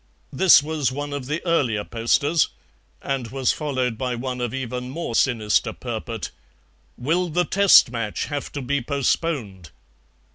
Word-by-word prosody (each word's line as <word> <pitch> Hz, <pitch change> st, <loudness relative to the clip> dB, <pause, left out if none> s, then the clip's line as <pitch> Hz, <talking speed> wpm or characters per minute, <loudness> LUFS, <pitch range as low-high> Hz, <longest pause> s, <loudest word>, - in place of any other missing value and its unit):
This 185 Hz, -6 st, +6 dB
was 150 Hz, -4 st, -1 dB
one 145 Hz, +2 st, -5 dB
of 140 Hz, -3 st, -5 dB
the 155 Hz, +5 st, -3 dB
earlier 130 Hz, -11 st, +1 dB
posters, 140 Hz, +9 st, +1 dB, 0.6 s
and 135 Hz, -3 st, -2 dB
was 130 Hz, +1 st, 0 dB
followed 130 Hz, -6 st, -2 dB
by 125 Hz, -1 st, -1 dB
one 125 Hz, +1 st, -4 dB
of 120 Hz, -2 st, -2 dB
even 125 Hz, -1 st, -4 dB
more 155 Hz, -3 st, -4 dB
sinister 115 Hz, -4 st, +1 dB
purport: -, -, -5 dB, 0.7 s
"Will 170 Hz, +8 st, 0 dB
the 175 Hz, +3 st, +1 dB
Test 200 Hz, -10 st, +6 dB
match 115 Hz, -4 st, -3 dB
have 145 Hz, -1 st, -5 dB
to 145 Hz, -, -4 dB
be 140 Hz, +2 st, 0 dB
postponed?" 125 Hz, -, -2 dB
135 Hz, 145 wpm, -23 LUFS, 120-150 Hz, 0.7 s, This